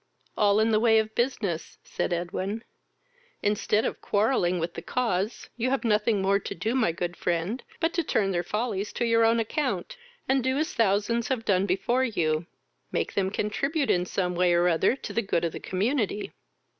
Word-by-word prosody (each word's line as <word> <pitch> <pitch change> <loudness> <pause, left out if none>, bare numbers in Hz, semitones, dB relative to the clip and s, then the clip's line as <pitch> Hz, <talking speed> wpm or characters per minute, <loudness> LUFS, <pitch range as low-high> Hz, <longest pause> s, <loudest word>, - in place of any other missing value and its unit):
"All 205 0 +3
in 220 +1 +3
the 215 - +4
way 225 -1 +5
of 220 0 0
business, 215 -9 -2
(said - - -3
Edwin.) 185 +5 -2 0.8
Instead 210 +1 +1
of - - -3
quarrelling 200 -4 +1
with 170 0 -3
the - - -6
cause, 220 -4 -1
you 245 +2 0
have 270 0 0
nothing 210 -2 +2
more 200 +1 +3
to - - -6
do, 215 +7 -1
my 245 -9 +2
good 175 +1 -4
friend, 175 +8 -1 0.2
but 330 0 +1
to 340 - +1
turn 200 -9 +1
their 175 -2 0
follies 210 +1 -2
to 240 - -1
your 230 0 +4
own 230 +1 +4
account, 225 - -2 0.3
and 265 -1 +2
do 260 +1 +1
as 315 +4 -1
thousands 225 +1 +1
have 245 -4 -2
done 195 0 +2
before 235 +8 +1
you 165 -9 0 0.4
make - - -1
them 190 -1 +1
contribute 275 - 0
in 180 0 +1
some 180 -1 -1
way 175 0 +3
or 175 +1 +3
other 170 +8 +3
to - - -7
the 230 - +1
good 175 -5 0
of 165 - -1
the - - -7
community." 210 +1 -1
210 Hz, 195 wpm, -27 LUFS, 180-235 Hz, 0.8 s, way